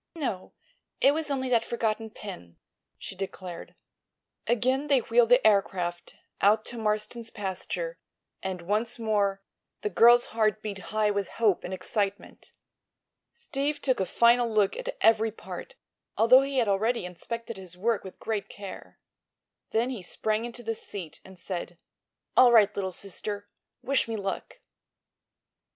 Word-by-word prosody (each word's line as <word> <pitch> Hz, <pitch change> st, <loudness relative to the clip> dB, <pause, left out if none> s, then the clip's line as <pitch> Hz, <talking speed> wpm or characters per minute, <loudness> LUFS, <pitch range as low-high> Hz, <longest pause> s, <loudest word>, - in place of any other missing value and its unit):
"No; 245 Hz, -, -4 dB, 0.5 s
it 275 Hz, -, +5 dB
was 310 Hz, -1 st, -2 dB
only 265 Hz, -2 st, -1 dB
that 235 Hz, -2 st, +3 dB
forgotten 225 Hz, -1 st, -2 dB
pin," 180 Hz, -, -10 dB, 0.4 s
she 195 Hz, -, -8 dB
declared. 185 Hz, -2 st, -7 dB, 0.7 s
Again 255 Hz, +5 st, +1 dB
they 275 Hz, -3 st, +4 dB
wheeled 230 Hz, 0 st, +3 dB
the 245 Hz, 0 st, +5 dB
aircraft 180 Hz, -4 st, +1 dB, 0.3 s
out 215 Hz, +2 st, +4 dB
to 240 Hz, -, -5 dB
Marston's 215 Hz, +2 st, -1 dB
pasture, 210 Hz, -, -4 dB, 0.4 s
and 185 Hz, -2 st, -4 dB
once 215 Hz, +6 st, 0 dB
more 205 Hz, -3 st, 0 dB, 0.4 s
the 210 Hz, -, -2 dB
girl's 240 Hz, +5 st, +7 dB
heart 215 Hz, -1 st, +1 dB
beat 205 Hz, -2 st, -4 dB
high 215 Hz, -1 st, +2 dB
with 200 Hz, -2 st, -1 dB
hope 215 Hz, -5 st, +2 dB
and 180 Hz, -, -5 dB
excitement. 195 Hz, +2 st, -3 dB, 0.8 s
Steve 295 Hz, -, -2 dB
took 260 Hz, -5 st, +1 dB
a 190 Hz, -, 0 dB
final 235 Hz, +3 st, +4 dB
look 210 Hz, -3 st, +2 dB
at -, -, -5 dB
every 225 Hz, 0 st, +4 dB
part, -, -, -9 dB, 0.4 s
although 250 Hz, +4 st, +7 dB
he 275 Hz, 0 st, -2 dB
had 240 Hz, -4 st, +3 dB
already 215 Hz, +2 st, +1 dB
inspected 230 Hz, +5 st, -6 dB
his 185 Hz, -2 st, -10 dB
work 220 Hz, +2 st, 0 dB
with 190 Hz, -, -10 dB
great 215 Hz, -2 st, -3 dB
care. 200 Hz, -2 st, -9 dB, 0.7 s
Then 235 Hz, +3 st, +1 dB
he 240 Hz, -6 st, -5 dB
sprang 215 Hz, +5 st, -1 dB
into 240 Hz, 0 st, -8 dB
the 225 Hz, 0 st, -1 dB
seat 190 Hz, -6 st, -7 dB
and 190 Hz, -1 st, -14 dB
said: 175 Hz, -1 st, -6 dB, 0.6 s
"All 250 Hz, -1 st, +7 dB
right, 215 Hz, -3 st, +5 dB
little 190 Hz, -1 st, -2 dB
sister. 205 Hz, +2 st, -5 dB, 0.4 s
Wish 275 Hz, -2 st, +2 dB
me 225 Hz, -, -3 dB
luck!" 200 Hz, -, -5 dB
215 Hz, 145 wpm, -28 LUFS, 195-240 Hz, 0.8 s, girl's